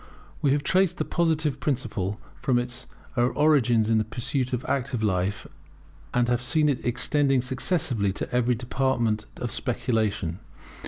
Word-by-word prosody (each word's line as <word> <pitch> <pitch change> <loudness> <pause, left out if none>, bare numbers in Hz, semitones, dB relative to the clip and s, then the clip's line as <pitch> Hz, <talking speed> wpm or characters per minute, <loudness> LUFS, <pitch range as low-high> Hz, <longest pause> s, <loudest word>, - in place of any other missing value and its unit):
We 140 - +3
have 145 0 0
traced 185 +3 +2
the - - -1
Positive 160 -4 0
principle 110 -7 -2 0.2
from 125 -1 +2
its 120 +1 -4 0.3
origin 125 -2 +3
in 110 0 +3
the - - +2
pursuits 120 +4 -2
of 125 0 -2
active 130 -4 -1
life, 95 -1 0 0.7
and 120 -1 +2
have 120 0 +1
seen 150 +4 +2
it 135 - -1
extending 135 +1 +2
successively 130 - +1
to - - -5
every 125 0 +2
department 120 -3 0
of 120 - -4
speculation. 110 -8 -1
125 Hz, 145 wpm, -26 LUFS, 110-140 Hz, 0.7 s, We